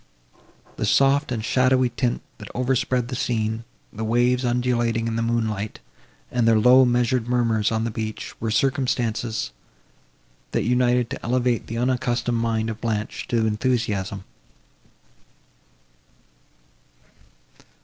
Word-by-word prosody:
The - - -1
soft 140 0 +3
and 115 -3 -2
shadowy 130 0 +3
tint, 120 0 -2 0.2
that 105 - -9
overspread 125 -1 0
the 130 - -3
scene, 115 -2 -1 0.3
the 110 - -5
waves, 120 +3 +2
undulating 120 -2 0
in 115 - -2
the 115 - 0
moonlight, 110 -3 -2 0.5
and 120 -2 +1
their 115 -1 +5
low 125 +4 +7
and 125 -2 +4
measured 120 0 +1
murmurs 115 -3 +1
on 110 0 0
the 115 - -2
beach, 110 0 -5
were 115 - -1
circumstances, 120 - 0 1.0
that - - +1
united 125 -1 +2
to - - -6
elevate 125 0 0
the 115 - -4
unaccustomed 120 -1 0
mind 115 -1 0
of 110 - -9
Blanche 110 -2 -3
to 115 -2 +1
enthusiasm. 105 -4 -1
120 Hz, 125 wpm, -23 LUFS, 110-125 Hz, 1.0 s, low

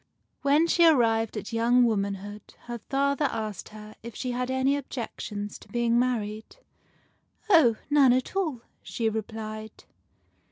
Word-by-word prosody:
When 285 +4 +4
she 340 +1 +1
had 325 -2 +7
arrived 225 -3 +1
at 210 +2 -6
young 240 +2 +4
womanhood, 205 -2 -2
her 240 0 -7
father 280 +5 0
asked 220 -6 -4
her 215 0 -11
if 235 0 -9
she 255 - -3
had 250 +1 -2
any 260 +1 +2
objections 225 -6 -5
to - - -16
being 235 -1 +1
married. 220 -4 -2 0.5
" - - -36
Oh, 295 - +6
none 285 -3 +5
at 255 +8 0
all," 315 -11 -1 0.2
she 225 -2 -2
replied. 220 0 -6
235 Hz, 150 wpm, -27 LUFS, 215-265 Hz, 0.5 s, had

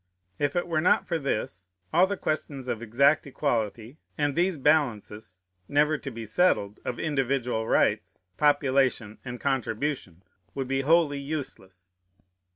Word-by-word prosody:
If 145 -1 0
it 175 - +1
were 160 -2 0
not 180 - +3
for 165 -2 -1
this, 105 - -3 0.3
all 180 +3 +5
the 200 0 -3
questions 145 -5 -3
of 115 -2 -3
exact 140 +7 +3
equality, 120 -2 -2 0.2
and 145 -2 0
these 175 0 +1
balances, 110 -9 0 0.3
never 150 +2 +3
to - - -6
be 115 -3 -7
settled, 105 - +1
of 125 - -4
individual 130 -6 -1
rights, - - +1 0.2
population, 135 -6 +1
and 125 -1 -6
contribution, 130 - -2 0.3
would 135 -2 -3
be 135 +1 0
wholly 150 -1 +3
useless. 130 - -7
135 Hz, 140 wpm, -27 LUFS, 110-150 Hz, 0.3 s, all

